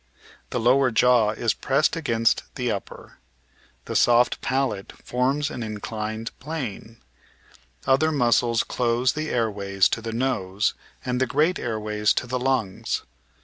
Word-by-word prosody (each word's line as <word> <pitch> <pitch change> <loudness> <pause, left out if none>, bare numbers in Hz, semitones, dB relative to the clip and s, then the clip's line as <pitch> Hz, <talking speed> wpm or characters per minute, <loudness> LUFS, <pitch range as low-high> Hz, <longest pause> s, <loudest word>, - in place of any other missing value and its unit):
The - - -2
lower 130 +3 +4
jaw 120 -1 +4
is 110 0 0
pressed 140 +5 +1
against 115 -8 +1
the 125 -3 -1
upper. 100 - -7 0.7
The - - -5
soft 120 0 +4
palate 130 -7 -1
forms 135 +4 -1
an 125 - -6
inclined 110 0 -4
plane. 130 -7 -6 0.9
Other 140 +4 +3
muscles 120 -4 +2
close 120 +1 +1
the 155 0 -3
air 115 -2 +1
ways 100 -2 +1
to 115 - -2
the 115 0 -4
nose 110 -5 0 0.3
and 125 0 -1
the 130 - +2
great 155 +8 +1
airways 105 -2 0
to - - -1
the 125 +1 -2
lungs. 125 -7 -1
120 Hz, 140 wpm, -24 LUFS, 110-130 Hz, 0.9 s, lower